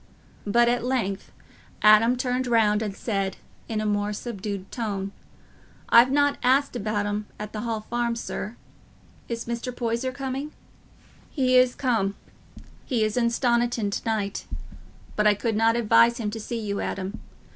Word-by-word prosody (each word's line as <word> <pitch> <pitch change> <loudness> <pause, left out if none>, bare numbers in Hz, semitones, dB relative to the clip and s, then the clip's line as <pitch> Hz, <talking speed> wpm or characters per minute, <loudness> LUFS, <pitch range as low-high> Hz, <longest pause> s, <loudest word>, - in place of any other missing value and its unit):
But 235 +3 +4
at 240 0 +1
length 230 -6 -2 0.5
Adam 215 +3 +6
turned 250 0 -1
round 220 -3 +3
and 210 -3 -3
said, 195 -4 -2 0.3
in 220 -2 -1
a 215 - -2
more 205 0 0
subdued 205 -3 -5
tone, 200 -4 -3 0.8
"I've 235 +2 +7
not 285 +1 +2
asked 265 +2 +2
about 210 -2 -1
'em 205 0 -3
at 210 0 -6
th' - - -5
Hall 225 0 -2
Farm, 235 +1 -1
sir. 230 -1 -5 0.7
Is 230 -1 -3
Mr. 235 +1 -3
Poyser 240 +1 -2
coming?" 270 +2 -5 0.8
"He 255 -3 +1
is 255 0 +5
come; 225 -7 0 0.7
he 240 -5 0
is 215 -1 0
in 240 -2 +2
Stoniton 235 -3 +1
to - - -2
night. 205 -3 -2 0.7
But 210 0 +3
I 210 - +5
could 225 +2 -1
not 225 +1 +3
advise 235 +1 +4
him 215 -4 -2
to 225 - -5
see 235 +2 -4
you, 200 -2 -3
Adam. 195 +3 -4
230 Hz, 155 wpm, -25 LUFS, 210-245 Hz, 0.8 s, I've